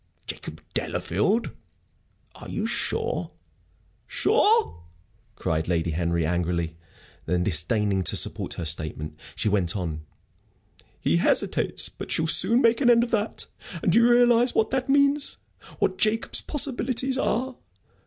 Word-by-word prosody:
"Jacob - - -8
Delafield? 225 +4 -1 0.8
Are - - -11
you - - -3
sure?" - - 0 0.8
"Sure?" 440 - +2 0.5
cried 80 0 -2
Lady 85 -1 0
Henry, 85 0 -1
angrily. 85 -1 -2 0.5
Then, 90 +1 0
disdaining 95 +3 +1
to - - +1
support - - 0
her 85 - -5
statement, 75 -1 -2 0.2
she - - -1
went 100 -4 +1
on: 80 -5 -4 1.0
"He 85 - +1
hesitates. - - +1
But - - -10
she'll 160 - +1
soon 185 - +4
make 230 +2 +3
an 245 - +4
end 235 -1 +5
of 240 - -5
that. 215 -1 -2 0.4
And - - +2
do 225 - +5
you 235 +1 +4
realize 240 0 +4
what 220 - +1
that 265 0 -2
means 280 +1 +2 0.4
what 185 0 -1
Jacob's 220 +1 0
possibilities 260 -2 +1
are? 255 +2 -1
185 Hz, 135 wpm, -25 LUFS, -, 1.0 s, end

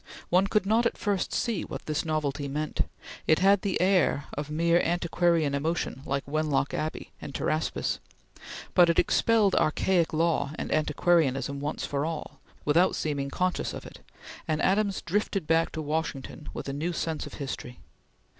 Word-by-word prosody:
One 185 +3 +4
could 210 -1 +1
not 225 +4 +3
at - - -5
first 200 -3 -1
see 230 -6 -1
what - - -7
this 155 -1 -1
novelty 150 -3 -1
meant; 150 +2 -2 0.4
it 155 - +5
had 195 +1 +4
the 200 -2 -1
air 180 -6 +3
of 145 0 -4
mere 170 +2 +3
antiquarian 170 -3 +1
emotion 145 -2 -1
like 140 0 -1
Wenlock 145 -2 0
Abbey 155 +1 -3
and 140 - -7
Pteraspis; 155 +1 -1 0.7
but 175 -2 +6
it 170 - +2
expelled 220 -4 +3
archaic 170 +2 +2
law 155 -3 +1
and - - -5
antiquarianism 145 -3 +2
once 145 +1 -3
for 140 0 -1
all, 155 -3 -5 0.3
without 170 +5 +4
seeming 140 -3 -2
conscious 180 +5 -1
of - - -8
it; - - -11 0.5
and 155 -1 0
Adams 200 0 +1
drifted 195 -1 -1
back 165 +1 +2
to 160 - -3
Washington 150 -1 -3
with - - -6
a 135 - -3
new 160 +5 -2
sense 160 -2 -2
of - - -9
history. 130 -3 -6
160 Hz, 165 wpm, -28 LUFS, 145-180 Hz, 0.7 s, but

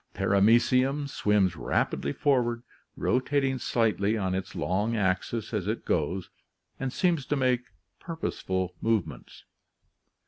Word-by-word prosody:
Paramecium 125 +7 +3
swims 105 -8 +1
rapidly 70 - -1
forward, 120 - +1 0.3
rotating 130 +1 +1
slightly 110 -3 +1
on 95 -3 -1
its 95 0 -4
long 105 +6 0
axis 105 +3 -1
as 100 -3 -1
it 110 +2 -2
goes, 90 +3 -1 0.5
and 135 -1 -2
seems 170 -2 +1
to 145 - -1
make 125 -2 +1 0.3
purposeful 95 - -3
movements. 110 -5 -2
115 Hz, 110 wpm, -28 LUFS, 95-130 Hz, 0.5 s, Paramecium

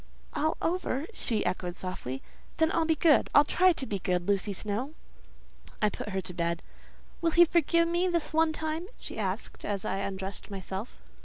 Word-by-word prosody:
"All 315 +1 0
over!" 325 -5 0
she 225 - 0
echoed 180 -1 -2
softly; 135 -8 -4 0.3
"then 320 0 +3
I'll 330 - +2
be 320 - +3
good. 310 -1 +4
I'll 290 - +9
try 370 +5 +4
to 275 - -4
be 200 -5 -3
good, 180 -1 0
Lucy 200 0 +1
Snowe." 215 - -3 0.8
I 210 - +3
put - - -6
her 190 -1 -1
to 180 - -6
bed. 170 -1 -1 0.6
"Will 335 - +3
he 345 +2 +7
forgive 335 0 +3
me 345 +2 +1
this 340 -3 -1
one 320 0 +4
time?" 315 +2 -3
she - - -6
asked, - - -3
as 200 -2 -2
I 190 - -1
undressed 195 0 -4
myself. 195 +2 -5
245 Hz, 180 wpm, -29 LUFS, -, 0.8 s, I'll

